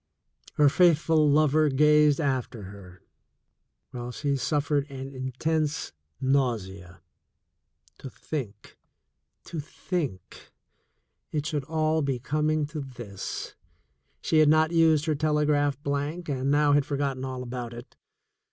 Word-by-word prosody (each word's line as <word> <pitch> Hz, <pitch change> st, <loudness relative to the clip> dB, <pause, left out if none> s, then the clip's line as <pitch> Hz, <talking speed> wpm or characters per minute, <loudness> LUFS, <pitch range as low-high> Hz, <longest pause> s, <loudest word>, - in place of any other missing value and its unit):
Her 150 Hz, -, +5 dB
faithful 160 Hz, -1 st, +4 dB
lover 155 Hz, +1 st, +4 dB
gazed 150 Hz, +1 st, +4 dB
after 130 Hz, -6 st, -2 dB
her, 95 Hz, -2 st, -12 dB, 0.9 s
while 120 Hz, 0 st, -6 dB
she 140 Hz, +2 st, -1 dB
suf 145 Hz, +2 st, -1 dB
fered 145 Hz, -1 st, +1 dB
an 135 Hz, 0 st, -7 dB
intense 150 Hz, +4 st, -2 dB, 0.3 s
nausea. 100 Hz, -10 st, -1 dB, 1.0 s
To 135 Hz, -, -8 dB
think 120 Hz, -8 st, -7 dB, 0.3 s
— -, -, -53 dB
to 165 Hz, -, -6 dB
think 145 Hz, -, -5 dB, 0.4 s
— -, -, -51 dB
it 150 Hz, -2 st, -2 dB
should 150 Hz, -3 st, -2 dB
all 160 Hz, 0 st, 0 dB
be 140 Hz, -3 st, -1 dB
coming 155 Hz, +4 st, 0 dB
to 155 Hz, -, -3 dB
this! 120 Hz, -7 st, -7 dB, 0.7 s
She 160 Hz, -, +3 dB
had 155 Hz, -1 st, +6 dB
not 155 Hz, +1 st, +4 dB
used 160 Hz, -2 st, +4 dB
her 155 Hz, -, +1 dB
telegraph 150 Hz, -1 st, +1 dB
blank, 145 Hz, +5 st, -3 dB
and 135 Hz, -1 st, -1 dB
now 145 Hz, 0 st, +3 dB
had 145 Hz, 0 st, +4 dB
forgotten 140 Hz, -2 st, -2 dB
all 130 Hz, -1 st, -4 dB
about 120 Hz, -1 st, -5 dB
it. 120 Hz, +1 st, -11 dB
145 Hz, 130 wpm, -27 LUFS, 130-155 Hz, 1.0 s, had